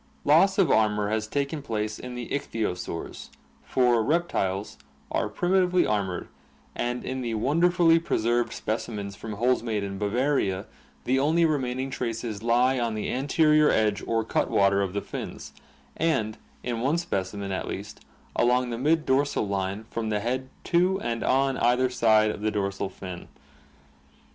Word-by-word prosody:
Loss 175 +7 +5
of 195 -4 +4
armor 105 -1 +2
has 110 0 -1
taken 140 +5 -2
place 110 -5 -3
in 125 0 -7
the 125 -1 -6
icbthyosaurs, 105 -11 -4 0.3
for 125 -3 +2
reptiles 105 - -1 0.3
are - - 0
primitively 180 0 +2
armored 100 -4 -1 0.5
and 120 0 -2
in 130 0 -3
the 115 -2 -2
wonderfully 165 - +3
preserved 120 -6 0
specimens 105 -3 -4
from 110 +1 -7
Holzmaden, 110 -4 0
Bavaria, 105 -3 0 0.4
the 130 +2 +2
only 160 +4 +3
remaining 135 -3 -1
traces 115 -4 -3
he 115 - -4
on 120 -1 +2
the 105 - -2
anterior 150 +3 +3
edge 105 -2 +1
or 115 -1 +1
cutwater 100 -2 +2
of 95 -2 -2
the 100 - -1
AQUATIC - - -10
ADAPTATION - - -7 0.5
331 155 -10 +1
fins, - - -11
and, - - -18 0.3
in 120 -2 -2
one 140 +6 +2
specimen 100 - -3
at 95 - -3
least, 100 +2 -6 0.4
along 125 +1 +2
the 115 - -3
mid 155 +4 +2
dorsal 135 -4 +1
line 100 +1 -2
from 115 -1 -2
the 105 -1 0
head 130 +4 -2
to 180 +3 +2
and 115 - -2
on 135 0 +2
either 125 +2 +3
side 110 -3 +4
of 105 - -7
the 110 - +1
dorsal 100 -2 -2
fin. 90 -2 -8
120 Hz, 155 wpm, -26 LUFS, 105-140 Hz, 0.5 s, Loss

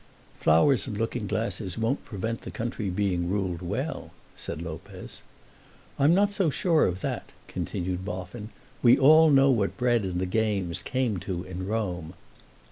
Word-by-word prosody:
"Flowers 110 - +4
and 105 -5 -4
looking 115 0 -2
glasses 105 -3 -2
won't 115 +5 0
prevent 115 +2 -4
the - - -8
country 115 -3 -3
being 90 -2 0
ruled 95 -3 -1
well," 115 - -3 0.3
said - - -6
Lopez. 80 -1 -8 0.8
"I'm 145 +5 +5
not 205 +1 +3
so 195 -5 +1
sure 160 +2 +2
of 90 +1 -3
that," - - -3 0.2
continued 90 +1 -3
Boffin. 95 +3 -6 0.3
"We 120 -1 +6
all 155 +3 +7
know 135 -1 +6
what 105 -6 0
bread 120 -2 +2
and 90 -3 -3
the 95 - 0
games 100 -3 -1
came 130 -6 -1
to 90 -1 -4
in 95 0 -6
Rome." 90 -6 -3
105 Hz, 155 wpm, -27 LUFS, 90-125 Hz, 0.8 s, all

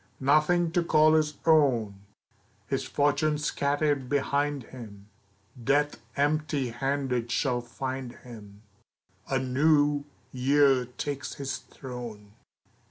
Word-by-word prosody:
Nothing 155 +5 +3
to 175 0 +1
call 155 -1 +4
his 155 -1 +2
own! 120 -11 +3 0.6
His - - -2
fortune 150 +1 +1
scattered 145 -2 0
behind 145 0 0
him; 105 -5 -11 0.5
Death 145 +3 +1 0.2
empty 145 -2 0
handed 130 -1 -2
shall 125 -1 0
find 130 +1 -5
him, 105 -4 -13 0.7
A 135 - +1
New 145 +2 +2 0.3
Year 135 0 +3
takes 135 +2 -5
his 140 -1 -4
throne. 120 -6 -9
140 Hz, 100 wpm, -27 LUFS, 125-145 Hz, 0.7 s, call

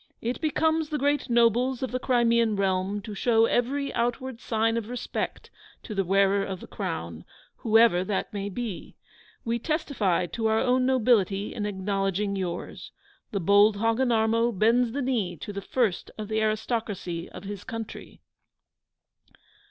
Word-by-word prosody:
it 240 +5 -3
becomes 315 0 +1
the 305 - -1
great 285 -1 0
nobles 240 +2 +3
of 260 - -2
the 255 - -1
Crimean 235 -3 +2
realm 195 +1 0
to 215 - -7
show 225 +2 +3
every 275 +5 0
outward 245 +1 -2
sign 225 0 0
of 230 -1 -3
respect 250 0 -4 0.3
to 215 - -6
the 195 -1 +1
wearer 195 +2 +3
of 190 -2 -5
the - - -10
Crown, 80 0 -5 0.3
whoever 225 -5 +4
that 190 +1 -3
may 200 0 -3
be. 220 -2 -6 0.5
We 235 +1 0
testify 260 - 0
to 220 +6 -2
our 220 0 +2
own 255 +1 +2
nobility 215 -6 +2
in 210 -2 -3
acknowledging 195 0 -1
yours. 180 -3 -5 0.4
The 200 - -2
bold 205 +3 +5
Hogginarmo 230 -1 +2
bends 230 +3 +3
the 280 +3 -2
knee 215 -9 -1
to 205 +7 -7
the 200 - -4
first 220 -3 -1
of 215 -1 -6
the 220 0 0
aristocracy 215 -5 -2
of - - -10
his 200 -1 -7
country. 225 -1 -8
220 Hz, 150 wpm, -26 LUFS, 200-245 Hz, 0.5 s, bold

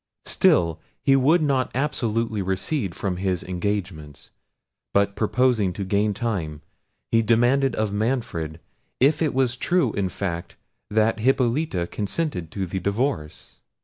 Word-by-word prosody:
Still 85 -1 +3 0.2
he 135 - +5
would 155 +6 +4
not 135 -4 +1
absolutely 115 -6 -1
recede 95 - -2
from 95 -3 -2
his 95 -2 -1
engagements; 90 -6 -4 0.6
but 100 0 +3
purposing 110 -4 +2
to 100 - -4
gain 100 +2 +1
time, 85 -10 -3 0.5
he 115 - +4
demanded 120 +4 +3
of 105 -2 -1
Manfred 105 - -2 0.4
if 145 +5 +3
it 155 -5 +1
was 130 -2 +2
true 140 -2 +1
in 100 -2 -1
fact 85 -3 -4 0.3
that 110 +1 +2
Hippolita 125 - +1
consented 100 - -3
to 95 +3 -3
the 95 +2 -3
divorce. 100 - -3
105 Hz, 130 wpm, -24 LUFS, 95-130 Hz, 0.6 s, he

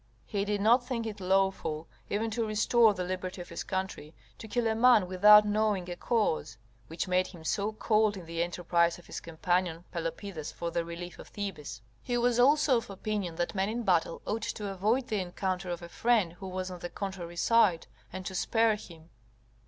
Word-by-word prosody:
He 200 -1 -2
did 205 -1 -1
not 235 +4 +5
think 245 -2 -3
it 210 -2 -5
lawful, 185 -4 0 0.2
even 220 +2 -1
to 230 +2 -1
restore 215 +1 +4
the 180 - -2
liberty 185 +1 -4
of 175 - -8
his - - -5
country, 190 -5 -4 0.2
to 220 - -8
kill 240 +2 -1
a 225 - +2
man 225 -4 +5
without 210 +3 +7
knowing 210 -3 +1
a - - -4
cause: 175 - 0 0.3
which 165 +4 -4
made 185 0 +2
him 170 -4 -12
so 205 +6 -1
cold 215 -1 +2
in 180 - -9
the 165 0 -3
enterprise 170 0 +1
of 175 - -16
his - - -6
companion 170 +1 -1
Pelopidas 165 -1 -5
for 170 0 -4
the 170 - 0
relief 170 +1 -8
of - - -10
Thebes. 150 - -6 0.2
He 245 - -1
was 240 0 +2
also 280 0 +5
of 230 - -5
opinion 195 -3 -3
that 175 +1 -2
men 195 0 0
in 235 +2 -3
battle 175 -4 +1
ought 225 +2 -2
to 205 -1 -4
avoid 215 +7 +1
the 210 -3 -1
encounter 185 0 -3
of 175 0 -4
a - - -7
friend 215 -2 +1
who 190 +2 -9
was 185 0 -4
on 180 - -7
the 175 - -5
contrary 180 -4 -6
side, 205 -5 +3 0.3
and 185 0 -7
to 190 - -4
spare 225 +3 +2
him. 165 -4 -14
190 Hz, 200 wpm, -30 LUFS, 175-215 Hz, 0.3 s, without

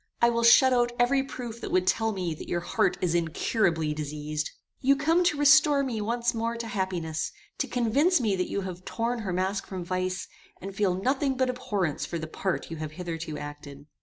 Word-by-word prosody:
I 235 0 +5
will 235 0 0
shut 255 +3 +7
out 240 -1 +2
every 250 +3 +3
proof 245 -4 -7
that - - -5
would 185 0 +2
tell 225 +4 +2
me 180 -5 -2
that 155 - -9
your 175 - 0
heart 175 - +1
is 175 -2 +1
incurably 165 -1 +1
diseased. 150 0 -4 0.3
"You 275 +1 +4
come 325 +6 +2
to 295 - +2
restore 290 -1 +6
me 235 -5 -2
once 235 +3 0
more 230 0 -2
to 230 - -4
happiness; 185 -7 -2 0.3
to - - 0
convince 275 +9 +2
me 215 -5 +1
that 180 -1 -2
you 200 - -2
have 185 -1 -6
torn 235 +4 -2
her 200 -4 -3
mask 190 +2 -1
from 185 -3 -5
vice, 185 +1 -2 0.3
and 195 +2 -7
feel 195 -2 +1
nothing 265 +6 0
but 260 -1 +2
abhorrence 205 - -2
for 170 - -3
the 160 - -4
part 175 +2 -3
you 165 - -5
have 155 -1 -5
hitherto 165 -3 -5
acted." 145 -1 -9
195 Hz, 205 wpm, -27 LUFS, 170-245 Hz, 0.3 s, shut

